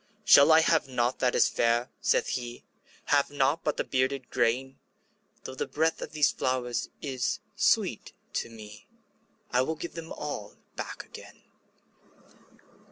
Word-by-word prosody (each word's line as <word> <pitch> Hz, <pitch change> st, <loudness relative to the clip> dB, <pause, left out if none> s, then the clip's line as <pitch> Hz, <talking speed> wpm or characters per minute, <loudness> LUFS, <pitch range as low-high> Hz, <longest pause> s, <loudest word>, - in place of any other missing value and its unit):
``Shall 140 Hz, -, +8 dB
I 160 Hz, 0 st, +7 dB
have 160 Hz, -2 st, +2 dB
nought 125 Hz, -1 st, -1 dB
that 125 Hz, -1 st, +1 dB
is -, -, +5 dB
fair?'' 120 Hz, +2 st, +1 dB
saith -, -, +2 dB
he; 120 Hz, -1 st, -5 dB, 0.5 s
``Have 145 Hz, -1 st, +3 dB
nought 145 Hz, +3 st, +1 dB
but 150 Hz, -, -1 dB
the -, -, 0 dB
bearded 130 Hz, 0 st, -1 dB
grain? 130 Hz, +2 st, 0 dB, 0.6 s
Though 130 Hz, -, -7 dB
the 130 Hz, -, -3 dB
breath 160 Hz, +2 st, 0 dB
of -, -, -6 dB
these 150 Hz, -2 st, +3 dB
flowers 125 Hz, -2 st, -2 dB
is 130 Hz, -4 st, -1 dB, 0.2 s
sweet -, -, +1 dB, 0.2 s
to -, -, -2 dB
me, 105 Hz, -2 st, -12 dB, 0.6 s
I 125 Hz, -, +3 dB
will 160 Hz, +5 st, -1 dB
give 170 Hz, +2 st, -7 dB
them 165 Hz, -1 st, -8 dB
all 145 Hz, -9 st, -6 dB, 0.2 s
back -, -, -6 dB
again.'' -, -, -13 dB
130 Hz, 150 wpm, -28 LUFS, 120-150 Hz, 0.6 s, ``Shall